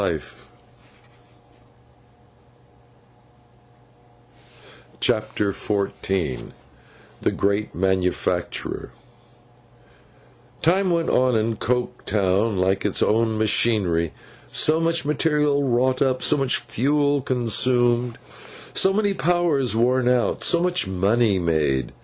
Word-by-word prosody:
CHAPTER 105 -2 0
XIV 95 -7 -3 0.7
THE - - +1
GREAT 100 +2 -1
MANUFACTURER 95 0 -2 1.7
TIME 185 +4 +2
went 170 -1 0
on 125 -1 +2
in 110 0 0
Coketown 105 -4 -1
like 95 +1 0
its 105 - +1
own 110 0 +1
machinery: 105 -6 +1 0.4
so 155 +1 +2
much 165 -1 +1
material 150 -1 +1
wrought 130 0 +1
up, 130 -2 +1
so 150 - +3
much 135 -3 0
fuel 140 +4 0
consumed, 120 -1 +1 0.6
so 190 - +3
many 205 0 +1
powers 170 - +1
worn 125 +2 +2
out, 125 -1 0
so 170 -1 +2
much 180 - 0
money 100 +3 +1
made. 75 -7 0
120 Hz, 85 wpm, -22 LUFS, 100-145 Hz, 1.7 s, so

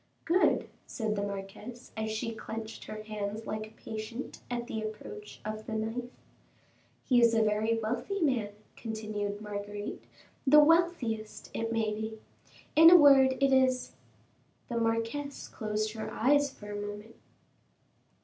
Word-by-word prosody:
"Good," 355 +3 +3 0.2
said 220 -3 -2
the 200 - -1
marquise, 200 +4 -7
as 220 0 -2
she 220 +1 -2
clenched 220 0 -7
her 215 0 -7
hands 215 0 -4
like 215 0 -4
a 220 - -21
patient 220 +3 -6
at 240 -1 -2
the 220 -2 -4
approach 220 - -7
of 215 0 -5
the 225 - -4
knife. 225 +3 -3 0.9
"He 245 -2 +4
is 230 -1 +5
a 225 - +4
very 215 +2 +1
wealthy 240 - -2
man," 255 - +1 0.3
continued 215 -2 -4
Marguerite; 205 0 -5 0.4
"the 300 +3 +9
wealthiest, 295 -9 +2
it 225 0 -2
may 220 -2 0
be. 220 +1 -5 0.6
In 325 +2 +10
a 355 - +10
word, 275 -4 +7
it 275 -1 +4
is 260 -1 +3 0.4
" 110 - -38
The 235 - -2
marquise 230 +5 -1
closed 215 -1 -2
her 220 -1 -5
eyes 285 +4 +3
for 210 -6 -10
a 205 0 -4
moment. 205 +2 -7
225 Hz, 150 wpm, -30 LUFS, 215-255 Hz, 0.9 s, In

